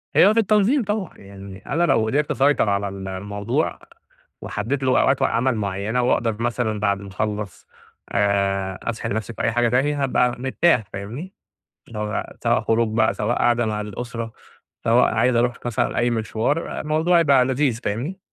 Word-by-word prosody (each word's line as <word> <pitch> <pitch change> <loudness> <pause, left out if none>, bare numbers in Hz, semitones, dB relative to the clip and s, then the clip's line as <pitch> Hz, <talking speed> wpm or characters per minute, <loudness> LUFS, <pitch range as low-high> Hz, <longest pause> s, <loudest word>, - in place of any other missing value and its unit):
هي 205 +3 +6
في 230 - +2
التنظيم 220 +5 +3
طبعًا. 205 -3 -3
يعني 100 0 -12
أنا 165 +6 0
لو 115 -9 +3
قدرت 145 +6 0
أسيطر 135 -5 +2
على 100 0 0
ال 95 0 -7
الموضوع 100 +2 -2 0.6
وحدِّدت 120 +7 -3
اللي 130 - +1
هو - - +4
أوقات 135 0 +2
عمل 125 +2 +2
معيّنة 105 +4 -1
وأقدر 115 -2 0
مثلًا 120 -3 -1
بعد 100 -1 +1
ما 100 - -9
أخلّص 105 0 -4 0.5
آآ 100 -2 0
أسحِل 115 -2 -3
نَفْسي 110 +1 -3
في - - -5
أي 115 - +1
حاجة 120 0 +2
تانية، 140 +4 +1
هابقى 125 -2 +1
مرتاح 130 0 +2
فاهمني؟ 120 - -7 0.6
اللي 110 -2 -7
هو 105 0 -3
سواء - - +2
خروج 115 0 +1
بقى، 110 - +3
سواء 115 +4 -1
قاعدة 120 0 +2
مع 105 -1 -2
الأسرة، 115 +2 -6 0.5
سواء - - +4
عايز 125 -1 +2
أروح 120 0 +1
مثلًا 120 -3 -1
أي 120 +1 +2
مشوار، 115 +7 -1
الموضوع 160 +3 +2
يبقى 140 -5 +4
لذيذ 130 -3 0
فاهمني؟ 135 - -3
115 Hz, 170 wpm, -22 LUFS, 105-135 Hz, 0.6 s, هي